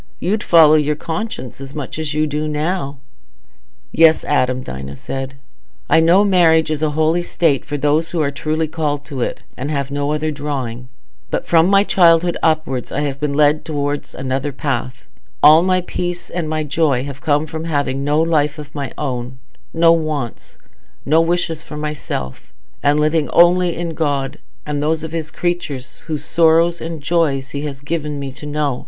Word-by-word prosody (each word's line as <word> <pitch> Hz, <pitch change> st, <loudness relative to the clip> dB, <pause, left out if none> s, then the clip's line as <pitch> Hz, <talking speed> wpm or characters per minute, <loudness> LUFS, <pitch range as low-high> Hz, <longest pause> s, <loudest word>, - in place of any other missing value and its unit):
You'd 210 Hz, +4 st, 0 dB
follow 160 Hz, -5 st, +6 dB
your 150 Hz, -1 st, +2 dB
conscience 160 Hz, -, -5 dB
as 135 Hz, +1 st, -9 dB
much 145 Hz, +1 st, -5 dB
as 150 Hz, -2 st, -3 dB
you 155 Hz, 0 st, +2 dB
do 150 Hz, +1 st, -2 dB
now." 150 Hz, -1 st, -2 dB, 0.9 s
"Yes, 160 Hz, -1 st, +5 dB
Adam," 130 Hz, -3 st, 0 dB
Dinah 65 Hz, -, -7 dB
said, 135 Hz, -, -6 dB, 0.6 s
"I -, -, +6 dB
know 170 Hz, +5 st, +5 dB
marriage 165 Hz, -5 st, +4 dB
is 155 Hz, -1 st, -2 dB
a 155 Hz, -, +2 dB
holy 160 Hz, +2 st, +2 dB
state 165 Hz, -5 st, +1 dB
for 145 Hz, -, -4 dB
those 150 Hz, +3 st, +1 dB
who 175 Hz, -, -3 dB
are 145 Hz, -2 st, +1 dB
truly 155 Hz, +3 st, -1 dB
called 150 Hz, -2 st, -2 dB
to 140 Hz, -4 st, -6 dB
it, -, -, -3 dB
and 135 Hz, +3 st, -4 dB
have 140 Hz, -2 st, -2 dB
no 145 Hz, +1 st, -1 dB
other 155 Hz, +1 st, -1 dB
drawing; 130 Hz, -5 st, -5 dB, 0.4 s
but -, -, -2 dB
from 165 Hz, 0 st, +4 dB
my 195 Hz, +1 st, +5 dB
childhood 170 Hz, -3 st, +4 dB
upwards 155 Hz, -6 st, 0 dB
I 145 Hz, -, -1 dB
have 140 Hz, -2 st, -3 dB
been 145 Hz, -1 st, -1 dB
led 150 Hz, +1 st, +3 dB
towards 145 Hz, -1 st, -3 dB
another 135 Hz, +2 st, -2 dB
path; 130 Hz, -2 st, -4 dB, 0.4 s
all 155 Hz, +2 st, +8 dB
my 185 Hz, 0 st, +2 dB
peace 175 Hz, 0 st, -4 dB
and 170 Hz, -3 st, -3 dB
my 155 Hz, 0 st, -1 dB
joy 145 Hz, -4 st, +1 dB
have 140 Hz, 0 st, -7 dB
come 150 Hz, 0 st, +1 dB
from 160 Hz, +1 st, -6 dB
having 140 Hz, -4 st, -1 dB
no 145 Hz, +2 st, +1 dB
life 155 Hz, -2 st, +1 dB
of 150 Hz, -1 st, -10 dB
my 140 Hz, -2 st, -4 dB
own, 130 Hz, -3 st, -4 dB, 0.3 s
no 165 Hz, 0 st, +4 dB
wants, 155 Hz, -7 st, -2 dB, 0.5 s
no 160 Hz, +3 st, +4 dB
wishes 165 Hz, -1 st, -1 dB
for 150 Hz, -2 st, -9 dB
myself, 150 Hz, -, -5 dB, 0.3 s
and 145 Hz, +1 st, +3 dB
living 155 Hz, 0 st, +1 dB
only 175 Hz, 0 st, +4 dB
in 170 Hz, -1 st, -3 dB
God 145 Hz, -2 st, -2 dB, 0.3 s
and 150 Hz, -1 st, -2 dB
those 155 Hz, +1 st, 0 dB
of 160 Hz, -, -5 dB
his 160 Hz, -1 st, -4 dB
creatures 160 Hz, -7 st, -3 dB
whose 155 Hz, -2 st, -3 dB
sorrows 165 Hz, +1 st, +3 dB
and 165 Hz, -2 st, -5 dB
joys 140 Hz, -4 st, 0 dB
he 140 Hz, -, -4 dB
has 140 Hz, -2 st, -7 dB
given 150 Hz, -1 st, -3 dB
me 140 Hz, -1 st, -5 dB
to 150 Hz, +3 st, -10 dB
know. 145 Hz, -3 st, -1 dB
150 Hz, 180 wpm, -18 LUFS, 140-165 Hz, 0.9 s, all